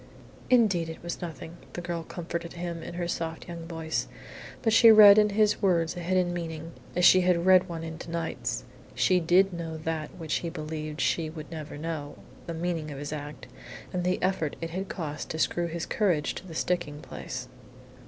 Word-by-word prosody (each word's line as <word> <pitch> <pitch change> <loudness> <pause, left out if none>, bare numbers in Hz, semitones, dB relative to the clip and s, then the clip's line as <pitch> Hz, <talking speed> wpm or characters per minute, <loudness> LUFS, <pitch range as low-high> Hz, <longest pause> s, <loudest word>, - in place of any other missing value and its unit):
"Indeed 205 -10 +4
it 160 - -9
was 170 - -5
nothing," 165 0 -7 0.2
the - - -4
girl 175 -1 -3
comforted 170 0 -5
him 170 -1 -5
in 170 - -7
her 175 -1 -2
soft 165 -1 -4
young 170 -1 -7
voice. 160 -1 -2 0.6
But 225 - +3
she 225 0 +9
read 210 -1 +10
in 210 0 +4
his 210 +1 +2
words 175 -4 +2
a - - -5
hidden 175 0 +1
meaning, 165 -1 -5 0.2
as 180 0 +3
she 185 - +8
had 180 -1 +2
read 185 0 +6
one 165 -1 -5
into 165 +1 -7
Knight's. 165 -1 -3 0.3
She 185 -2 +3
did 180 +3 +4
know 165 -2 -5
that 155 -1 -4
which 160 -3 -2
he 170 - -3
believed 155 -2 -5
she 160 -2 +1
would 155 -1 -9
never 155 -3 -7
know: 150 -2 -4 0.3
the 170 - -4
meaning 165 -2 -2
of 145 - -7
his 145 +2 -5
act, 150 0 -7 0.5
and 180 -1 -1
the 180 +1 +1
effort 185 -5 0
it 165 0 -5
had 190 +3 -4
cost 150 -5 -5
to - - -3
screw 170 +2 +1
his 170 0 -4
courage 180 -9 +1
to 190 - -9
the 165 - -9
sticking 160 -4 -1
place. 125 -5 -6
170 Hz, 195 wpm, -28 LUFS, 160-180 Hz, 0.6 s, read